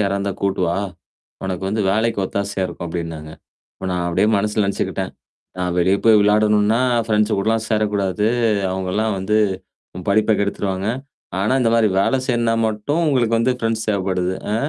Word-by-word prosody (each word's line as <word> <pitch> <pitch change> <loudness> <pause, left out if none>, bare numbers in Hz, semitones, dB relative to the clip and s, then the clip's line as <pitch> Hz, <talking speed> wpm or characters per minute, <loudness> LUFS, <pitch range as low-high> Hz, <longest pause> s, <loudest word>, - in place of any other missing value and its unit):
யாரா 100 -1 +1
இருந்தா 100 0 -2
கூட்டுவா? 90 -3 0 0.7
உனக்கு 95 -1 -3
வந்து 105 +1 0
வேலைக்கு 110 +2 +1
ஒத்தாசையா 100 -1 -2
இருக்கும் 85 - -7
அப்டின்னாங்க. 80 -2 -5 0.4
இப்ப 95 - -7
நான் 90 -1 -1
அப்படியே 90 +4 +2
மனசுல 105 +1 0
நெனைச்சுக்கிட்டேன். 100 - -2 0.5
"நான் 90 -1 -1
வெளிய 95 +3 +3
போய் 110 -2 +7
விளையாடணும்னா, 105 +2 +3 0.3
ஃப்ரெண்ட்ஸ் 105 0 +2
கூடலாம் 110 +2 0
சேரக்கூடாது. 105 -2 0 0.5
அவங்கலாம் 95 +3 -1
வந்து 95 +3 0 0.6
உன் 90 - -8
படிப்ப 110 +1 +3
கெடுத்துருவாங்க. 100 -1 -2 0.5
ஆனா 105 +5 +1
இந்த 115 -2 +2
மாரி 110 -2 +4
வேலை 135 - +2
செய்யனா 115 -2 +1
மட்டும் 110 +10 -1
உங்களுக்கு 120 -5 +2
வந்து 125 +3 +2
ஃப்ரெண்ட்ஸ் 115 -1 -1
தேவைப்படுது." 95 -2 0 0.2
அ - - +1
105 Hz, 150 wpm, -20 LUFS, 95-110 Hz, 0.7 s, போய்